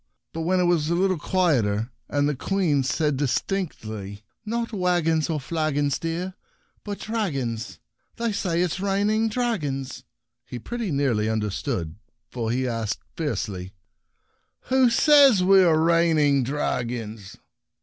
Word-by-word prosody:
But 165 - -4
when 185 +3 +1
it - - +3
was 170 -3 +2
a 170 - +1
little 185 -1 +1
quieter, 125 - +1 0.2
and 145 0 +1
the 150 - 0
Queen 165 -1 +1
said 140 +2 0
distinctly, 110 - -3
" - - -52
Not 230 +1 -2
waggons 175 -5 +1
or 155 -2 -1
flagons, 145 -1 -1
dear— 170 +3 -3 0.5
but 205 -1 -5
dragons 140 - -3 0.2
/ - - -45
They 235 -1 -1
say 180 -4 0
it 180 - -1
is - - -4
rain 200 +2 +1
ing 220 +1 +1
dragons 155 - -2 0.2
/" - - -59
he 125 - -5
pretty 230 - -4
nearly 125 -7 +1
understood, 105 - -2 0.3
for 115 -3 -3
he 130 +2 0
asked, 115 -3 -3
fierce 150 -7 -2
ly, 95 -1 -7 0.4
" - - -46
Who 260 -1 +5
says 275 -4 +6
we 190 0 +6
are 160 -3 +4
reigning 160 -4 +3
dragons 120 -6 -3
155 Hz, 150 wpm, -24 LUFS, 125-190 Hz, 0.5 s, says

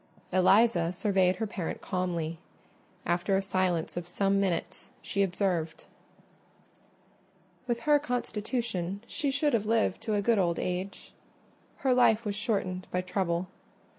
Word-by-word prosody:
Eliza 185 -1 +4
surveyed 185 -1 +2
her 220 - -2
parent 190 -5 -4
calmly. 170 -4 -2 0.7
After 175 +3 +1
a - - +1
silence 185 -4 0
of 175 0 -5
some 195 +2 +2
minutes 185 -4 -2
she 200 - 0
observed— 180 -4 -1 1.8
"With 235 -1 -1
her 295 +2 +4
constitution 225 - -2
she 290 +1 -2
should 280 +2 +1
have 215 -2 +1
lived 225 -4 +1
to 215 - -1
a 205 - +2
good 230 0 +3
old 170 -3 +1
age: 185 +2 -4 0.7
her 260 - +5
life 230 -2 +4
was 205 -1 -1
shortened 195 -4 -1
by 180 - 0
trouble." 180 -1 -1
195 Hz, 135 wpm, -29 LUFS, 180-220 Hz, 1.8 s, her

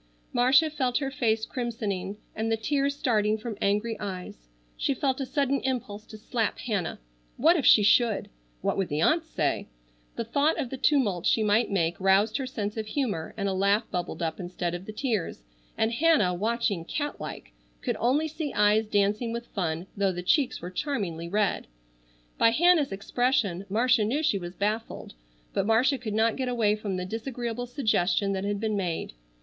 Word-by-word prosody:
Marcia 270 +6 +4
felt 260 -5 0
her 275 -2 -2
face 225 -4 0
crimsoning, 210 -6 -3 0.2
and 225 +1 -1
the 225 - +2
tears 280 +4 0
starting 215 -5 +1
from 220 0 -6
angry 210 +3 +1
eyes. 180 - -7 0.3
She 275 - 0
felt 265 0 0
a 265 - -3
sudden 275 -1 0
impulse 220 -5 -3
to 215 - -10
slap 220 0 -2
Hannah. 205 -8 -2 0.4
What 325 +7 +5
if 300 - +1
she 210 - +7
should! 220 +1 +3 0.3
What - - 0
would 195 -2 0
the 150 - -2
aunts 320 0 +2
say? - - -1 0.5
The - - -2
thought 285 +7 +1
of 270 -6 -3
the 265 - -4
tumult 255 - +2
she 220 - +3
might 215 +3 +3
make 175 -3 0
roused 195 +4 +3
her 265 -2 -3
sense 210 -4 -4
of 220 -1 -3
humor 215 - -2
and 200 -1 -1
a 195 - 0
laugh 200 +4 +1
bubbled 180 -1 -3
up 160 +1 -2
instead 175 -1 -3
of 175 +2 -6
the - - -5
tears, 215 - -2 0.3
and 220 +1 +1
Hannah, 295 - +3
watching, 210 -2 -1
cat 290 - -4
like, - - -7 0.3
could - - -1
only 275 +7 +2
see 310 -2 -4
eyes 210 +1 +3
dancing 210 +3 +1
with 235 +1 -4
fun 170 -3 -2
though 195 -1 +1
the 180 0 -5
cheeks 260 - +2
were 180 - -5
charmingly 180 - -3
red. 205 +1 0 0.7
By - - +6
Hannah's 320 - +4
expression 200 -2 0
Marcia 235 +2 +3
knew 265 +9 0
she 210 -10 +2
was 175 0 -7
baffled, 215 +3 -3 0.4
but 200 - 0
Marcia 250 +5 +3
could 215 -4 -4
not 225 +1 +2
get 260 -2 -1
away 220 -4 +2
from 205 -3 -4
the 180 - -3
disagreeable 235 +3 -4
suggestion 200 -6 +1
that 190 0 -2
had 205 0 -1
been 215 0 -1
made. 180 - -2
220 Hz, 185 wpm, -27 LUFS, 195-255 Hz, 0.7 s, she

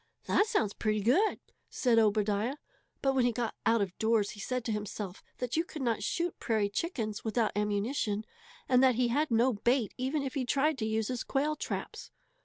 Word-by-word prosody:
"That 415 - +3
sounds 220 - +1
pretty 215 -1 0
good," 330 - +3 0.3
said 240 -3 +3
Obadiah; 210 +3 +2 0.5
but 270 -1 +3
when 260 -2 +3
he 245 - +3
got 235 -1 -2
out 225 -2 +4
of 185 -2 -6
doors 220 -2 +2
he 205 - -11
said 250 +3 -3
to 225 - -1
himself 210 -2 -4 0.2
that 250 -2 -3
you 325 - +2
could 310 -5 -7
not 230 -3 0
shoot 340 +11 -2
prairie 215 -3 +1
chickens 220 - -3
without 220 0 +1
ammunition, 210 +1 -1 0.4
and 255 -1 +4
that 255 -2 +5
he 245 0 +2
had 295 +6 +1
no 240 +2 +3
bait 235 +2 +1
even 275 +3 -1
if 270 - -4
he 275 -3 -1
tried 280 +4 +1
to 220 - -1
use 220 -1 -1
his 250 -2 -2
quail 295 +3 0
traps. - - -5
235 Hz, 200 wpm, -31 LUFS, 215-265 Hz, 0.5 s, that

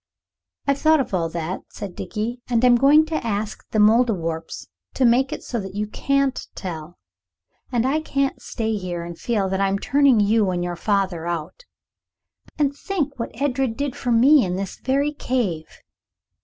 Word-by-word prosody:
"I've 280 0 +1
thought 315 0 +4
of 265 - -2
all 170 -3 0
that," 170 +2 -4 0.2
Dickie 215 +5 -5
said, 245 - -2
"and 230 +2 +4
I'm 245 -1 +7
going 285 +5 +6
to 315 0 -3
ask 215 -1 -3
the - - -2
Mouldiwarps 210 -7 +2 0.3
to 260 - +2
make 255 +4 +3
it - - -5
so 240 - -3
that 195 -1 -7
you 210 +1 -1
can't 275 +5 0
tell. 170 -2 -7 0.7
I 260 +5 +1
can't 275 -3 -1
stay 220 -2 -2
here 175 -3 -4
and 170 0 -7
feel 205 +1 -1
that 190 +1 -1
I'm 195 0 +2
turning 270 +1 +3
you 210 0 +3
and 175 -1 -1
your 175 0 -3
father 190 -3 -1
out. 170 - -5 0.9
And 285 -2 +1
think 295 -5 -3
what 230 0 -5
Edred 265 -4 0
did 280 -2 -2
for 245 - -2
me, 260 +5 +6
in 180 -2 -2
this 195 0 -5
very 280 +3 +1
cave. 205 - -2
230 Hz, 170 wpm, -22 LUFS, 190-270 Hz, 0.9 s, I'm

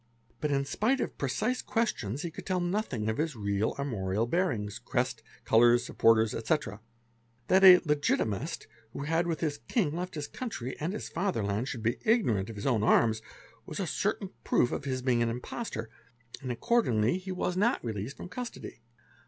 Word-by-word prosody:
But 150 - -1
in 140 -1 +1
spite 230 - +1
of - - -3
precise 215 - 0
questions, 145 - -1
he 170 - -3
could - - -9
tell 185 -1 +1
nothing 175 - -1
about 110 +6 0
his 160 -3 -2
real 100 0 -1
armorial 110 -6 -1
bearings, 120 - -1
crest, - - -1 0.2
colours, 120 +1 +5
supporters, 115 -1 +3
etc. 115 -4 -1 0.7
That 190 +1 +5
a 185 -1 +10
" - - -27
Legitimist 145 - 0
'', 110 0 -32
who - - -5
had 165 +3 +1
with 165 -2 -2
his 150 -3 -1
king 170 -11 +1
left 180 0 -4
his 150 -1 -4
country 135 - -5
and 165 +6 -2
his - - -5
fatherland, 115 - -1
should 120 -5 -5
be 115 +1 0
ignorant 120 - +2
of 115 - -7
his 100 - -6
own 120 -6 +2
arms 110 0 +3 0.5
was - - -5
a - - 0
certain - - -1
proof 120 - +2
of - - -3
his 130 -2 -2
being 125 -2 +2
an 120 - +2
impostor, 120 - -5 0.5
and 130 -2 -3
accordingly 125 - +2
he 190 0 -6
was 180 -1 -1
not 210 - +1
released 110 +4 -4
from - - -7
custody. 235 - -7
135 Hz, 185 wpm, -30 LUFS, 115-180 Hz, 0.7 s, a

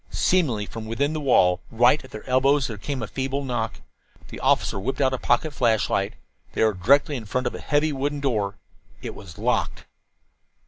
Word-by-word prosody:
Seemingly 135 - +1
from 110 +1 -8
within 140 +7 0
the 155 - -2
wall, 90 -10 +3
right 120 +6 +3
at 130 - -13
their 110 -3 -10
elbows, 135 +2 +3
there 110 -3 -5
came 130 +3 -4
a - - -4
feeble 135 +3 -3
knock. 120 -4 -3 0.5
The - - -8
officer 100 - +1
whipped 135 +8 -3
out 130 -2 +2
a 130 - -2
pocket 145 +5 +1
flashlight. 115 -5 +1 0.4
They - - +1
were 110 -1 +3
directly 140 +11 +3
in 115 - -8
front 125 +5 -2
of 120 - -1
a - - -6
heavy 150 +1 +1
wooden 145 +2 -2
door. 110 -7 -1 0.5
It - - -5
was 90 -6 -12
locked. - - -1
130 Hz, 190 wpm, -24 LUFS, 110-140 Hz, 0.5 s, wall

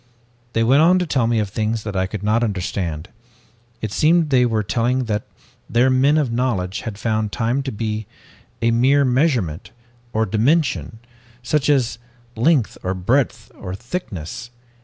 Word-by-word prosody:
"They 115 - +2
went 135 +6 +5
on 175 +3 +5
to 180 - 0
tell 130 -7 +1
me 115 -1 +1
of 105 -2 0
things 110 +2 -2
that 105 -2 -5
I 95 0 +1
could 100 0 -6
not 110 +3 +2
understand. 90 -6 -3 0.7
It 110 - -3
seemed 160 +4 +3
they 125 -2 +4
were 110 -2 0
telling 125 +5 0
that 105 -3 -3 0.4
their 120 +4 +3
men 135 +4 +4
of 140 -6 +1
knowledge 115 -6 -1
had 110 -4 -6
found 110 -1 -1
time 120 +4 0
to 135 -1 -4
be 110 -1 -3 0.6
a 115 - +3
mere 135 +5 +4
measurement, 125 - 0 0.4
or 110 +1 +1
dimension, 115 - +1 0.5
just 145 +3 +1
as 125 -5 +2 0.4
length 125 0 +2
or 95 +1 -2
breadth 120 +9 0
or 90 0 -7
thickness. 120 - -6
115 Hz, 160 wpm, -21 LUFS, 105-130 Hz, 0.7 s, went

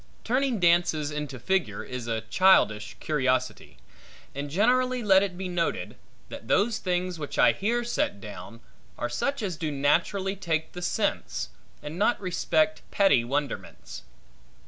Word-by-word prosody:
Turning 255 -1 0
dances 170 -4 +2
into 150 -3 -5
figure, 190 +10 -1
is 125 -2 -6
a 115 -1 -1
childish 110 - +3
curiosity. 130 -4 -1 0.6
And 140 +1 -5
generally 250 - +2
let 190 -2 +6
it 190 -3 -3
be 190 0 -4
noted, 175 -2 -2 0.3
that - - -9
those 220 +1 +2
things 180 -1 -2
which 145 - -5
I - - +6
here 235 +4 -1
set 280 +5 -1
down, - - -10 0.4
are - - -2
such 280 -4 -2
as 185 -6 -3
do 155 -1 -2
naturally 175 +8 +1
take 160 -4 -2
the 180 - -8
sense, 175 - -1 0.3
and 155 +4 -6
not 235 +4 +2
respect 160 -4 0
petty 195 -12 +4
wonderments. 140 +2 -4
175 Hz, 145 wpm, -27 LUFS, 145-200 Hz, 0.6 s, let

